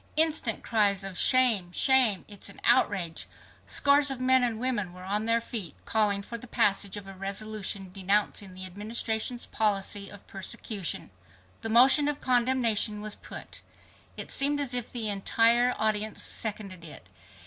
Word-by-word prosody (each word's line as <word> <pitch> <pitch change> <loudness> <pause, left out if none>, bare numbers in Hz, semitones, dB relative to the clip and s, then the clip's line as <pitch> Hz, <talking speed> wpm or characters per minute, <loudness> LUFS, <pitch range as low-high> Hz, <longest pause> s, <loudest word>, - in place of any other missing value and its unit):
Instant 310 -7 +2
cries 205 -3 +1
of 195 -1 -7
"Shame! 230 -7 +4
Shame! 245 -4 +4
It's 205 -1 -5
an 200 - -11
outrage!" 175 -5 +1 0.4
Scores 285 0 +4
of 270 -2 -3
men 260 0 +3
and 240 -2 0
two - - -9
women 220 -8 -2
were 180 0 -12
on 205 +3 -2
their 230 0 +3
feet 225 -6 -6
calling 205 -2 +1
for 235 +3 -7
the 250 - -12
passage 200 -2 +1
of 205 - -8
a 195 - -10
resolution 195 0 -5
denouncing 195 0 -1
the 185 0 -6
Administration's 220 +5 -2
policy 200 -1 -2
of 205 -1 -13
persecution. 195 - -5 0.5
The 225 - -4
motion 265 +6 +5
of 295 -1 -2
condemnation 240 -4 +1
was 215 0 -2
put. - - -9 0.6
It - - -5
seemed 290 +1 0
as 275 -3 -3
if 245 -2 -2
the 230 -3 -2
entire 230 +4 +2
audience 215 0 -1
seconded 200 -5 -5
it. 150 - -12
215 Hz, 160 wpm, -27 LUFS, 195-245 Hz, 0.6 s, motion